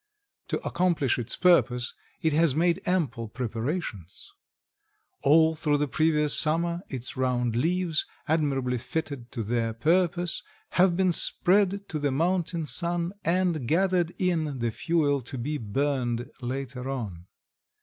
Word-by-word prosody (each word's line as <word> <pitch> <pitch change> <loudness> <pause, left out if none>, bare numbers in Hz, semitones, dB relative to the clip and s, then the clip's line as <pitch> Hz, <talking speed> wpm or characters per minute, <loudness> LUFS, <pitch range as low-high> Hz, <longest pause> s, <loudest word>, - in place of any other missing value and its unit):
To - - -1
accomplish 170 -8 +1
its 120 0 -2
purpose 125 -9 +3 0.3
it 160 -2 +2
has 155 -3 +3
made 170 +1 +2
ample 150 -11 0
preparations. 115 - -5 0.9
All 160 +3 +5
through 150 -2 0
the 150 0 0
previous 150 +1 +2
summer 170 +2 +2
its 125 -2 -5
round 125 -3 0
leaves, 165 +4 0 0.2
admirably 135 -5 0
fitted 140 -3 -5
to 115 -4 -3
their 115 +1 -1
purpose, 175 +5 +1 0.3
have 180 -1 +3
been 190 -1 +3
spread 200 +3 +3
to 155 - -3
the 145 -1 0
mountain 170 +2 0
sun 170 +3 -1
and 170 -6 0
gathered 180 +1 +2
in 160 -6 0
the 120 -2 -1
fuel 145 0 0
to 130 +2 -7
be 145 +5 -3
burned 120 +1 -2
later 130 0 -4
on. 100 -10 -5
150 Hz, 130 wpm, -27 LUFS, 125-170 Hz, 0.9 s, All